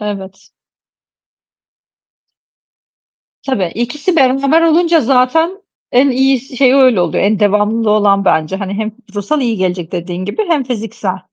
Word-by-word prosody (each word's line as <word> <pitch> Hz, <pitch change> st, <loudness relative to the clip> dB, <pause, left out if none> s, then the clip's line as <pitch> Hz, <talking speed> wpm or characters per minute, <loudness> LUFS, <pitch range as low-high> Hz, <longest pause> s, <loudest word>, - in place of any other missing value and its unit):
Evet. 195 Hz, -2 st, -7 dB, 3.0 s
Tabii, 195 Hz, -10 st, -1 dB
ikisi 280 Hz, -, -2 dB
beraber 275 Hz, +3 st, +3 dB
olunca 335 Hz, 0 st, +3 dB
zaten 275 Hz, -, +1 dB, 0.3 s
en 265 Hz, +3 st, +4 dB
iyisi, 265 Hz, 0 st, 0 dB
şeyi, 260 Hz, 0 st, +4 dB
öyle 255 Hz, -8 st, +4 dB
oluyor, 175 Hz, -, 0 dB
en 205 Hz, 0 st, +1 dB
devamlılığı 210 Hz, +2 st, +1 dB
olan 200 Hz, -2 st, +2 dB
bence. 160 Hz, +1 st, 0 dB
Hani, 195 Hz, 0 st, -5 dB
hem 215 Hz, +1 st, -3 dB, 0.2 s
ruhsal 205 Hz, +9 st, -2 dB
iyi 235 Hz, -4 st, -1 dB
gelecek 180 Hz, -2 st, -3 dB
dediğin 175 Hz, +1 st, -5 dB
gibi 205 Hz, -, -2 dB
hem 300 Hz, -5 st, +1 dB
fiziksel. 215 Hz, -6 st, -4 dB
230 Hz, 125 wpm, -14 LUFS, 195-270 Hz, 3.0 s, en